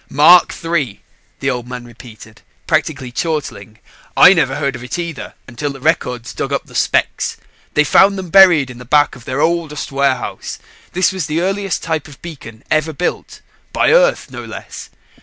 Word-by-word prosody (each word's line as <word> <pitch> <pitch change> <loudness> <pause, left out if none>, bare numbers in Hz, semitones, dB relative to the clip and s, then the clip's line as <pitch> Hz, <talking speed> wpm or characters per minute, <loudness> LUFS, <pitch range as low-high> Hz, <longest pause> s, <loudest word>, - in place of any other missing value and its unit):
"Mark 155 +5 +6
III," 150 -11 -1 0.4
the 135 - 0
Old 125 -1 -5
Man 125 -1 -7
repeated, 110 -2 -14 0.2
practically 145 -5 -1
chortling. 120 - -4 0.4
"I 185 - +9
never 140 -7 +1
heard 140 -2 -2
of 120 - -9
it 125 - -5
either 170 -4 -6
until 140 +4 -4
Records 125 -5 -1
dug - - -4
up - - -2
the - - -17
specs. - - 0 0.4
They 150 - +5
found 195 +7 +4
them 185 -3 -7
buried 175 -9 +6
in 120 - -12
the - - -9
back 145 +4 +2
of 120 - -15
their 130 +3 -2
oldest 160 -4 -1
warehouse. 135 -3 -2 0.4
This 185 +2 +2
was 185 -6 -4
the 155 +2 -1
earliest 195 +1 -2
type 160 -2 -2
of 145 -3 -14
beacon 125 -10 -10
ever 155 +1 +1
built 175 +5 -4 0.3
by - - +2
Earth, - - +3
no - - -7
less. - - -9
145 Hz, 175 wpm, -17 LUFS, 125-170 Hz, 0.4 s, I